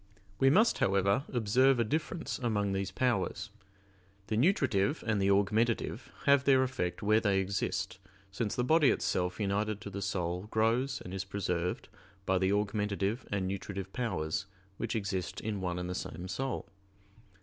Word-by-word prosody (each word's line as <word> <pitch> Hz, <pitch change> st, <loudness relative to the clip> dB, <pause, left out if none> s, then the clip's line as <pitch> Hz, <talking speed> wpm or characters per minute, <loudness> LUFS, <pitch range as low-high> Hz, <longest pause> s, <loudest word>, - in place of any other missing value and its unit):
We 135 Hz, -, +5 dB
must, 215 Hz, -, +4 dB
however, 100 Hz, +7 st, +2 dB
observe 125 Hz, +3 st, +3 dB
a -, -, +4 dB
difference 155 Hz, +7 st, -2 dB
among 105 Hz, -5 st, 0 dB
these 95 Hz, 0 st, -1 dB
powers. 110 Hz, -1 st, -1 dB, 0.8 s
The 110 Hz, -, 0 dB
nutritive 130 Hz, -, +2 dB
and 110 Hz, -3 st, +1 dB
the 95 Hz, -, +3 dB
augmentative 110 Hz, +4 st, +1 dB
have 140 Hz, -2 st, +5 dB
their 135 Hz, -2 st, +5 dB
effect 115 Hz, -6 st, -3 dB
where 110 Hz, +1 st, +4 dB
they 100 Hz, -3 st, +2 dB
exist, 95 Hz, -1 st, -2 dB, 0.3 s
since 105 Hz, +2 st, -2 dB
the 125 Hz, -, 0 dB
body 155 Hz, +1 st, +5 dB
itself 90 Hz, +2 st, 0 dB
united 105 Hz, +1 st, 0 dB
to 100 Hz, -, -7 dB
the 100 Hz, +1 st, -5 dB
soul 90 Hz, +1 st, -2 dB
grows 120 Hz, +5 st, +1 dB
and 90 Hz, -, -8 dB
is 95 Hz, 0 st, -2 dB
preserved 90 Hz, -3 st, -2 dB, 0.4 s
by 95 Hz, -1 st, +2 dB
the 95 Hz, +1 st, +2 dB
augmentative 105 Hz, +2 st, -1 dB
and 100 Hz, -2 st, 0 dB
nutritive 95 Hz, 0 st, -5 dB
powers 95 Hz, -8 st, -2 dB, 0.3 s
which 115 Hz, +1 st, -3 dB
exist 95 Hz, -4 st, -2 dB
in 105 Hz, -3 st, -3 dB
one 90 Hz, -1 st, -2 dB
and 90 Hz, 0 st, -3 dB
the 90 Hz, -, -3 dB
same 90 Hz, 0 st, -5 dB
soul. 120 Hz, +7 st, -3 dB
105 Hz, 160 wpm, -31 LUFS, 95-120 Hz, 0.8 s, We